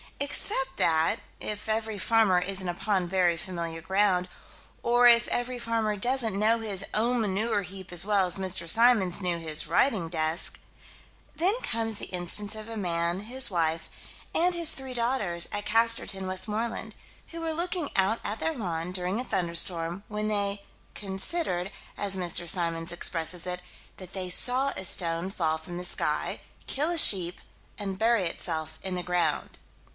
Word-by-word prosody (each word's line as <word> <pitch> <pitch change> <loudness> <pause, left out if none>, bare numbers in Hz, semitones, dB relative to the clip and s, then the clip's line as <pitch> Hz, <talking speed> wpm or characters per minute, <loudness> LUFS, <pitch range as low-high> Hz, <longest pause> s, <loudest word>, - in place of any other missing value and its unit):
Except 270 -1 -2
that 160 0 +3 0.2
if 210 0 -4
every 220 -1 -2
farmer 215 -3 +3
isn't 190 +1 -3
upon 180 +1 -1
very 175 -2 +1
familiar 170 -1 -5
ground 190 0 +1 0.5
or 240 +1 +5
if 235 0 +6
every 245 +1 -2
farmer 225 -2 -1
doesn't 230 -1 +1
know 220 +3 +3
his 200 -3 -1
own 235 +2 +1
manure 210 +1 0
heap 190 0 -9
as 175 +1 +4
well 200 -2 +2
as 180 - +1
Mr. 185 -3 -1
Symons 220 -5 +4
knew 180 -2 0
his 160 -2 -4
writing 195 -11 +1
desk 160 0 -2 0.8
Then 385 +8 +1
comes 225 -2 -1
the - - -2
instance 195 +4 +3
of 215 0 -8
a 225 - -6
man, 170 -1 -1
his 255 +5 +1
wife, 165 -2 -1 0.4
and 355 +2 +2
his 335 -2 +4
three 265 -1 -6
daughters, 220 -8 0
at 205 0 -4
Casterton, 225 -4 +2
Westmoreland, 215 +5 -3 0.3
who 335 0 -7
were 325 -1 -2
looking 340 -1 -2
out 195 +4 +2
at 215 - -3
their 325 - -1
lawn, 175 -6 -3
during 185 +3 -2
a - - -1
thunderstorm, 170 -2 -1
when 210 0 -3
they 200 -1 -1 0.3
"considered," 195 - -1 0.2
as 200 -1 +1
Mr. 175 -1 0
Symons 165 -2 0
expresses 175 0 -1
it, 180 0 -3 0.4
that 185 -2 -11
they 185 -2 -3
saw 255 +7 +3
a 190 - -4
stone 170 0 +2
fall 160 -5 -1
from 175 +2 -8
the 180 - -5
sky, - - -2 0.2
kill 295 +4 -1
a 345 - -1
sheep, 180 - +7 0.4
and 195 -2 -5
bury 230 -2 +2
itself 160 -2 -4
in 190 -1 -3
the 180 - -3
ground. 180 -1 -1
195 Hz, 160 wpm, -27 LUFS, 175-230 Hz, 0.8 s, sheep